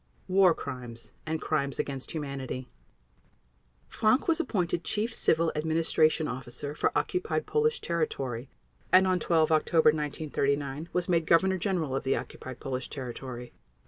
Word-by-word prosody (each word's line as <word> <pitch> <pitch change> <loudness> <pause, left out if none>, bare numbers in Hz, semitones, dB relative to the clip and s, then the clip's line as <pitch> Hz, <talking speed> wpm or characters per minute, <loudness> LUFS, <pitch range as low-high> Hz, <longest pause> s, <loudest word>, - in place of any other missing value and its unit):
War 185 -2 +5
Crimes 125 -4 -7 0.2
and 160 0 -1
Crimes 140 -4 -1
against 135 -2 -3
Humanity 135 -4 -4 1.2
Frank 225 +8 +2
was 330 -1 +3
appointed 180 - -1
Chief 220 +2 -1
Civil 165 -4 +2
Administration 160 0 +2
Officer 125 +3 -5
for - - +1
occupied 370 +5 -1
Polish 455 +1 +1
territory 135 -7 -2 0.4
and, 185 +1 +7
on 185 -1 +2
12 160 -2 +2
October 160 0 +4
1939, 145 0 -1
was 180 -1 -1
made 165 -3 +2
Governor 190 +3 +4
General 165 -8 -1
of 135 - -2
the 135 - +2
occupied 130 -1 -7
Polish 130 -1 -4
territory. 125 -2 -7
155 Hz, 135 wpm, -29 LUFS, 135-180 Hz, 1.2 s, and